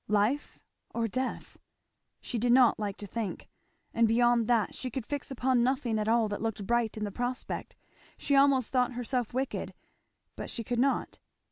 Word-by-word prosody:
life 215 +8 +1 0.4
or 230 -1 +1
death? 255 +4 -4 0.6
she 240 - -3
did 240 +2 +2
not 250 -2 +5
like 205 -2 -3
to 205 - -7
think; 210 -1 -4 0.5
and 230 0 +4
beyond 235 0 +3
that 230 -5 +2
she 255 - -4
could 250 -1 -4
fix 290 +1 -4
upon 255 -1 +1
nothing 245 -3 +1
at 210 - -1
all 230 0 +3
that 205 -1 -4
looked 220 -3 -3
bright 235 0 0
in 215 - -3
the 205 - -3
prospect; 245 +4 -4 0.4
she 285 - +1
almost 275 -3 +4
thought 250 0 +2
herself 245 -1 -2
wicked, 260 +2 -3 0.6
but - - -6
she 230 - -4
could 240 +1 -2
not. 275 +2 0
240 Hz, 175 wpm, -30 LUFS, 220-255 Hz, 0.6 s, not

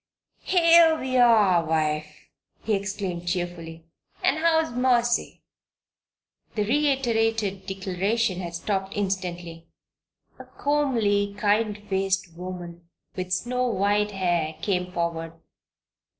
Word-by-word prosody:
"Here 335 -2 +5
we 255 0 -3
are, 215 -8 +5
wife!" 155 -1 -1 0.5
he 220 - 0
exclaimed, 195 -3 -3
cheerfully. 170 -2 -4 0.4
"And 305 - +2
how's 320 -2 +2
Mercy?" 240 -1 +1 1.1
The 210 - +1
reiterated 225 -7 0
declaration 195 +2 -1
had 170 -2 -5
stopped 195 +2 -3
instantly. 175 -4 -4 0.7
A - - -10
comely, 225 -9 0
kind 210 +1 +1
faced 195 -2 -1
woman 175 -1 -8 0.3
with 185 -1 -5
snow 250 +7 0
white 205 -1 +1
hair, 175 -5 -1
came 180 -3 -1
forward. 165 -2 -3
195 Hz, 100 wpm, -25 LUFS, 175-230 Hz, 1.1 s, Here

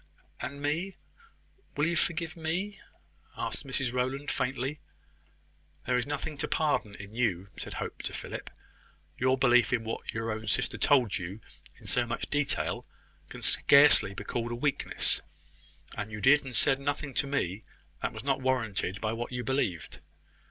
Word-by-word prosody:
"And 140 +1 -5
me! 170 +7 -1 0.8
Will 145 - +3
you 170 +1 +1
forgive 165 0 0
me?" 175 +5 -2 0.6
asked 145 - -2
Mrs 130 -2 0
Rowland, 130 +3 -1
faintly. 135 +3 -1 1.1
"There 125 - +2
is 125 +1 +1
nothing 145 +1 -3
to - - 0
pardon 145 -9 +1
in 100 +2 -10
you," 100 -6 0
said - - -6
Hope - - -4
to - - -4
Philip. - - -6 0.7
"Your 130 +1 +3
belief 125 -3 +5
in 120 -3 +1
what 115 0 -4
your 115 0 -2
own 110 0 -4
sister - - 0
told 125 -9 +4
you 90 +4 -6 0.4
in - - -16
so 120 -1 +1
much 115 - -3
detail 145 -1 0 0.4
can - - -9
scarcely 140 -9 +6
be 100 - -5
called 120 +2 -2
a - - -1
weakness; 140 +3 +1 0.7
and 105 -1 -4
you 105 - -5
did 145 +7 +6
and 130 -3 -6
said 135 +5 +3
nothing 140 0 -2
to 140 +2 +1
me 110 -8 -1 0.4
that - - 0
was - - -8
not 135 -1 +1
warranted 110 -7 0
by 110 0 0
what 120 +2 -4
you 125 -1 -2
believed. 110 - -1
130 Hz, 165 wpm, -30 LUFS, 115-145 Hz, 1.1 s, scarcely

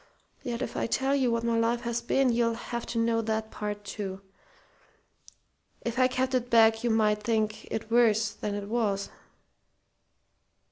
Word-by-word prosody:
Yet 245 -1 -3
if - - -5
I - - -1
tell 265 +4 +1
you 260 -3 +2
what 230 0 0
my 230 -1 +1
life 235 +1 +1
has 235 0 -2
been 255 +2 +2
you'll 230 -1 +1
have 235 0 -5
to 235 - -4
know 230 0 +2
that 220 0 -2
part, 205 0 -5
too. 195 -2 -5 1.6
If 235 +2 -2
I 255 - +6
kept 260 +1 -1
it 245 -1 0
back 225 -1 +5
you 240 - +1
might 215 -1 +2
think 215 -1 -1
it 220 0 -4
worse 225 -2 +4
than 210 0 -4
it 205 0 -5
was." 210 -3 -1
230 Hz, 170 wpm, -28 LUFS, 215-240 Hz, 1.6 s, I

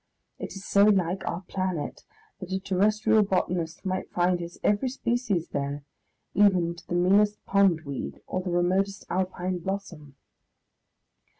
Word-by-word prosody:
It - - -6
is 195 +1 -8
so 200 0 +5
like 190 -3 +2
our 170 - -2
planet 185 -4 -3 0.3
that 185 -1 -8
a 190 - 0
terrestrial 210 +3 +3
botanist 180 -3 -1
might 185 0 -2
find 180 0 +2
his 170 0 -8
every 210 +5 +2
species 235 - -1
there, 140 0 -3 0.5
even 185 -4 +4
to 170 +1 -15
the 175 - -2
meanest 205 +4 +4
pondweed 165 -9 +1
or 185 - -2
the 185 - -4
remotest 185 +3 0
Alpine 185 0 -1
blossom.... 170 -6 -6
185 Hz, 135 wpm, -27 LUFS, 175-200 Hz, 0.5 s, so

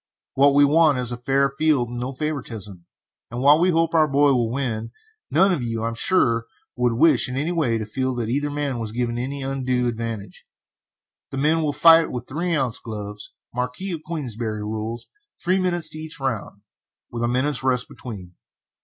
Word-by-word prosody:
What 140 +1 +4
we 145 0 +7
want 150 -1 +4
is 125 -1 -2
a 120 - -3
fair 135 +3 +1
field 150 -6 +2
and 120 0 -5
no 125 +2 -3
favoritism, 115 - -5 0.4
and 120 +1 -5
while 145 +4 +6
we 180 +2 +3
hope 165 -1 +2
our 160 -2 +5
boy 140 0 +4
will 120 -3 +1
win, 115 -4 -2 0.4
none 190 +4 +4
of 160 - -1
you, 115 -2 -3
I 115 - 0
am - - -5
sure, 115 -4 +2 0.3
would 125 -1 +1
wish 140 +3 +4
in 130 - -4
any 155 +5 -1
way 145 -10 +1
to 110 - -4
feel 130 +4 -2
that 120 -2 -2
either 145 +5 0
man 145 -4 -2
was 110 -2 -4
given 120 0 -1
any 135 +2 -4
undue 130 -2 0
advantage. 115 -5 -5 0.8
The 135 - -6
men 155 +4 +2
will 150 -2 0
fight 165 +2 +6
with 125 -1 -6
3 170 +4 -1
oz. 130 -5 0
gloves, 105 -2 -7 0.2
Marquis 125 +10 -3
of 165 -3 -4
Queensbury 120 -9 -4
rules, 110 +2 -4 0.3
three 185 +2 +1
minutes 175 -2 0
to 155 - -6
each 155 -1 -6
round, 115 -6 -3 0.5
with 120 - -4
a 120 - +1
minute's 130 +3 0
rest 130 -1 +1
between. 95 -8 -9
130 Hz, 195 wpm, -23 LUFS, 115-150 Hz, 0.8 s, we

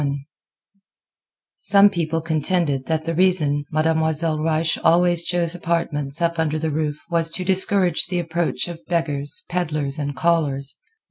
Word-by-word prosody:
XXI 140 -1 -1 1.4
Some 200 0 +5
people 165 -3 -1
contended 155 -3 -1
that 160 -1 -1
the 165 - -1
reason 160 -5 +2
Mademoiselle 160 0 +1
Reisz 160 +1 0
always 175 0 +4
chose 175 -1 0
apartments 165 -3 -2
up 170 0 0
under 155 -1 0
the 160 0 -2
roof 150 0 -2
was 165 -1 +1
to 180 +3 -5
discourage 190 -2 +2
the 180 0 -2
approach 170 0 -1
of 170 -1 -8
beggars, 165 +1 -2
peddlars 155 -5 -2
and 145 -1 -3
callers. 145 -4 0
165 Hz, 140 wpm, -21 LUFS, 150-175 Hz, 1.4 s, Some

